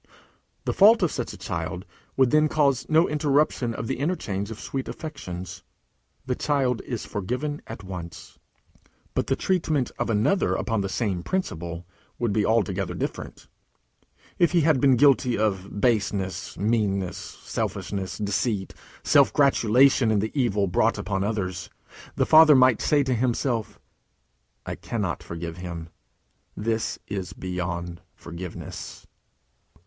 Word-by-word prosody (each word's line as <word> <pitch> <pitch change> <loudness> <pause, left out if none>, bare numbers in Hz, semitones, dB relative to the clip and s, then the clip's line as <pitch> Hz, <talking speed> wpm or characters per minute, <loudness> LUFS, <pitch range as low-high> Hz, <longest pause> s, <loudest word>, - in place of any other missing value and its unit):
The - - 0
fault 215 +1 +6
of 170 - +2
such - - -3
a - - -10
child - - -4 0.3
would 130 -2 +4
then 155 0 +4
cause 140 -5 +1
no 160 +2 +4
interruption 145 -5 +1
of - - -4
the 115 - -3
interchange 110 - -2
of 115 - -7
sweet 135 -1 -4
affections. 95 - -7 0.6
The 130 - 0
child 130 -3 0
is 120 -4 -4
forgiven 125 +9 -3
at 110 -2 -8
once. 90 -3 -9 0.7
But - - -1
the - - +2
treatment 160 -8 0
of - - -1
another 115 - +2
upon 115 -3 -1
the 100 - -2
same 95 -4 -1
principle 85 - -3 0.3
would 115 -4 0
be 105 - +2
altogether 100 -5 0
different. - - -5 0.9
If 175 0 +3
he 170 - +4
had 150 -4 +3
been 135 -2 +5
guilty 130 -1 +4
of 100 -1 -1
baseness, 100 -4 0
meanness, 100 -4 0
selfishness, 95 -1 -4
deceit, 105 -1 -1 0.3
self - - +5
gratulation 130 -2 +4
in 110 - +2
the 110 +2 -1
evil 110 -8 +1
brought 105 +5 +1
upon 95 -1 -2
others, 95 -4 -3 0.5
the - - +2
father 155 -1 +8
might 130 -3 +5
say 145 -2 +3
to 130 -1 0
himself: 120 -1 -1 0.9
"I - - -4
cannot - - -3
forgive 85 0 -6
him. 85 -2 -7 0.7
This 110 +1 -1
is 95 -2 -4
beyond 90 -2 -4
forgiveness." 85 0 -8
110 Hz, 135 wpm, -25 LUFS, 95-135 Hz, 0.9 s, father